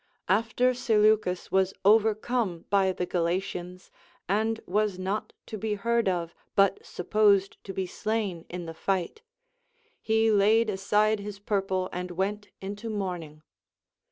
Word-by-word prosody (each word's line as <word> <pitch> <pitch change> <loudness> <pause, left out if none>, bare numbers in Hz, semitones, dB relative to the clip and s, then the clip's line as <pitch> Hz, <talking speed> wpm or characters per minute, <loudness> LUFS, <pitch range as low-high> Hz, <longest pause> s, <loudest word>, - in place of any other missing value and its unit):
After 230 +5 +2
Seleucus 215 -6 +2
was 190 0 +2
overcome 215 -3 +2
by 195 -2 +4
the 180 -1 -3
Galatians, 180 +1 -3 0.4
and 220 +3 +1
was 205 0 0
not 190 +3 -3
to 215 - -7
be 215 +1 -1
heard 230 0 +1
of, 170 -2 -2 0.2
but 195 -1 +3
supposed 200 +1 +2
to 195 - -5
be 190 0 -2
slain 210 -4 -2
in 175 -1 -5
the 165 - -6
fight, 190 - -2 0.8
he 220 0 +2
laid 215 +2 +4
aside 210 +2 +2
his 205 0 -6
purple 195 -2 -1
and 180 0 -4
went 200 +4 -2
into 205 +4 -5
mourning. 175 -7 -4
200 Hz, 130 wpm, -27 LUFS, 185-215 Hz, 0.8 s, by